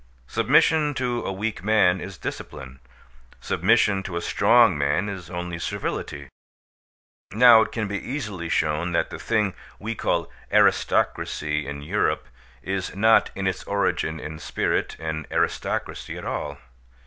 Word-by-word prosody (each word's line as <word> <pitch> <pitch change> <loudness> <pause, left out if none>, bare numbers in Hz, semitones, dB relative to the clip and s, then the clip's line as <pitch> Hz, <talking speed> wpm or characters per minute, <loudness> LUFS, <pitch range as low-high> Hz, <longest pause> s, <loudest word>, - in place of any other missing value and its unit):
Submission 150 - +3
to 125 -2 -1
a - - -1
weak 105 0 -3
man 95 -4 +3
is 95 0 -7
discipline. 65 -2 -7 0.6
Submission 105 0 +2
to 90 -3 -5
a - - -2
strong 115 0 +4
man 70 +8 0
is 95 -5 -6
only 85 -1 -5
servility. 70 -3 -4 1.1
Now 115 0 +8
it - - -1
can 110 -3 -2
be 100 0 -4
easily 105 - -4
shown 80 +3 0
that 85 - 0
the - - -7
thing 105 -4 0 0.2
we 110 +3 -4
call 85 -6 -1 0.2
aristocracy 75 -1 +1
in 70 0 -6
Europe 75 - 0 0.4
is 95 -2 -3
not 110 +3 +4
in 95 - -3
its 95 -1 -1
origin 80 -5 -1
and 80 +1 -7
spirit - - -1
an 80 -1 -4
aristocracy - - -2
at - - -8
all. 70 -1 -4
95 Hz, 140 wpm, -24 LUFS, 80-110 Hz, 1.1 s, Now